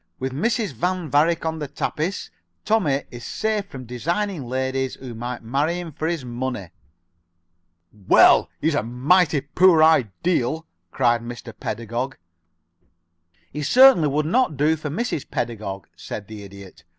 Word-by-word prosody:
"With 130 Hz, 0 st, -4 dB
Mrs. 210 Hz, -, -1 dB
Van 175 Hz, +4 st, -2 dB
Varick 165 Hz, +3 st, +2 dB
on 160 Hz, 0 st, -2 dB
the 150 Hz, -, -4 dB
tapis, 160 Hz, +7 st, -3 dB, 0.3 s
Tommie 160 Hz, -11 st, +1 dB
is 120 Hz, -1 st, -9 dB
safe 215 Hz, -2 st, -2 dB
from 130 Hz, -9 st, -9 dB
designing 170 Hz, -, -2 dB
ladies 130 Hz, +1 st, -2 dB
who 125 Hz, -3 st, -9 dB
might 120 Hz, +1 st, -6 dB
marry 145 Hz, +9 st, 0 dB
him 170 Hz, -2 st, -7 dB
for 155 Hz, +2 st, -3 dB
his 165 Hz, -6 st, -2 dB
money." 120 Hz, -6 st, -4 dB, 1.4 s
"Well, -, -, +6 dB
he's 160 Hz, +1 st, +1 dB
a 145 Hz, -, +1 dB
mighty 145 Hz, +7 st, +2 dB
poor 160 Hz, +3 st, +4 dB
ideal!" 155 Hz, -, +2 dB, 0.2 s
cried 120 Hz, +2 st, +2 dB
Mr. 120 Hz, -1 st, -8 dB
Pedagog. 120 Hz, +5 st, -4 dB, 1.3 s
"He 150 Hz, -, -5 dB
certainly 245 Hz, -, +6 dB
would 150 Hz, +2 st, 0 dB
not 180 Hz, -, +1 dB
do 150 Hz, +3 st, +3 dB
for 155 Hz, -1 st, -6 dB
Mrs. 200 Hz, -, -3 dB
Pedagog," 105 Hz, -6 st, -4 dB
said 100 Hz, -2 st, -7 dB
the 110 Hz, -1 st, -9 dB
Idiot. 100 Hz, -3 st, -12 dB
140 Hz, 140 wpm, -22 LUFS, 120-170 Hz, 1.4 s, Well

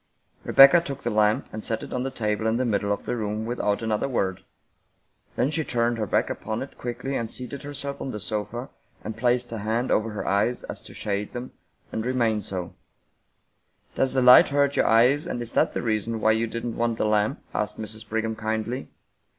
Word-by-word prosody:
Rebecca 140 Hz, +5 st, +8 dB
took 140 Hz, -5 st, -6 dB
the 120 Hz, -, -1 dB
lamp 105 Hz, 0 st, +2 dB
and 110 Hz, -, -5 dB
set 110 Hz, -1 st, -1 dB
it -, -, -8 dB
on 125 Hz, -, -1 dB
the 135 Hz, -, -2 dB
table 110 Hz, -3 st, -1 dB
in 110 Hz, +1 st, +1 dB
the 130 Hz, -, 0 dB
middle 100 Hz, -3 st, 0 dB
of 100 Hz, -, -2 dB
the -, -, -1 dB
room 110 Hz, -1 st, -3 dB
without 115 Hz, -2 st, -1 dB
another 110 Hz, +4 st, 0 dB
word. 95 Hz, -7 st, -1 dB, 0.9 s
Then 130 Hz, +5 st, +1 dB
she 160 Hz, 0 st, +1 dB
turned 120 Hz, -2 st, 0 dB
her 105 Hz, -, -1 dB
back -, -, +1 dB
upon 110 Hz, +2 st, -4 dB
it 135 Hz, -, -11 dB
quickly 125 Hz, +3 st, -4 dB
and 115 Hz, -3 st, -2 dB
seated 125 Hz, +3 st, -6 dB
herself 140 Hz, -1 st, -5 dB
on -, -, -4 dB
the 105 Hz, -, -5 dB
sofa, 110 Hz, +5 st, -4 dB, 0.3 s
and 110 Hz, -, -5 dB
placed 120 Hz, +1 st, +1 dB
a 115 Hz, -, -4 dB
hand 110 Hz, +4 st, -1 dB
over 110 Hz, +1 st, +2 dB
her 105 Hz, -, -5 dB
eyes 105 Hz, +5 st, +1 dB
as -, -, -7 dB
if -, -, -13 dB
to -, -, -12 dB
shade 100 Hz, 0 st, -3 dB
them, 125 Hz, +1 st, -6 dB, 0.4 s
and 110 Hz, -, -2 dB
re 125 Hz, +2 st, -1 dB
mained 115 Hz, -4 st, +1 dB
so, 90 Hz, -3 st, -4 dB, 0.6 s
" -, -, -43 dB
Does 130 Hz, -1 st, +2 dB
the 130 Hz, -, +3 dB
light 125 Hz, 0 st, +9 dB
hurt 140 Hz, 0 st, +2 dB
your -, -, +3 dB
eyes, 125 Hz, +6 st, +4 dB
and -, -, -3 dB
is 120 Hz, -1 st, -4 dB
that -, -, +2 dB
the -, -, -3 dB
reason 110 Hz, 0 st, -1 dB
why 110 Hz, -, +4 dB
you 110 Hz, +1 st, +1 dB
didn't 115 Hz, +1 st, -4 dB
want 115 Hz, -1 st, 0 dB
the -, -, 0 dB
lamp?" 105 Hz, +4 st, +1 dB
asked 105 Hz, 0 st, -2 dB
Mrs. 110 Hz, 0 st, -5 dB
Brigham 110 Hz, 0 st, -1 dB
kindly. 110 Hz, +3 st, -3 dB
115 Hz, 220 wpm, -25 LUFS, 110-125 Hz, 0.9 s, light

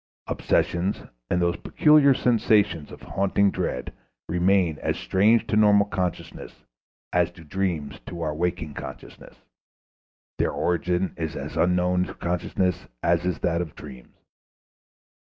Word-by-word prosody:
Obsessions 90 Hz, +4 st, 0 dB, 0.3 s
and 90 Hz, -, +1 dB
those 85 Hz, 0 st, +1 dB
peculiar 150 Hz, -3 st, +4 dB
sensations 105 Hz, -11 st, +2 dB
of -, -, -12 dB
haunting 100 Hz, 0 st, +1 dB
dread 65 Hz, -, -3 dB, 0.3 s
remain 90 Hz, -2 st, +2 dB
as -, -, -1 dB
strange 105 Hz, +5 st, +3 dB
to -, -, -1 dB
normal 105 Hz, -1 st, +5 dB
consciousness 90 Hz, -4 st, -5 dB, 0.5 s
as -, -, +3 dB
do 85 Hz, -, -15 dB
dreams 80 Hz, -4 st, -3 dB
to 85 Hz, -, -7 dB
our 75 Hz, -1 st, -1 dB
waking 85 Hz, -1 st, -2 dB
consciousness; 65 Hz, -1 st, -10 dB, 1.0 s
their -, -, +1 dB
origin 90 Hz, +2 st, 0 dB
is 80 Hz, -2 st, -4 dB
as -, -, -6 dB
unknown 90 Hz, +1 st, +2 dB
to -, -, -9 dB
consciousness 90 Hz, +1 st, -2 dB, 0.2 s
as 85 Hz, 0 st, +2 dB
is 90 Hz, -2 st, 0 dB
that 85 Hz, 0 st, +1 dB
of 80 Hz, -4 st, -6 dB
dreams. 65 Hz, -4 st, -12 dB
90 Hz, 130 wpm, -25 LUFS, 85-100 Hz, 1.0 s, normal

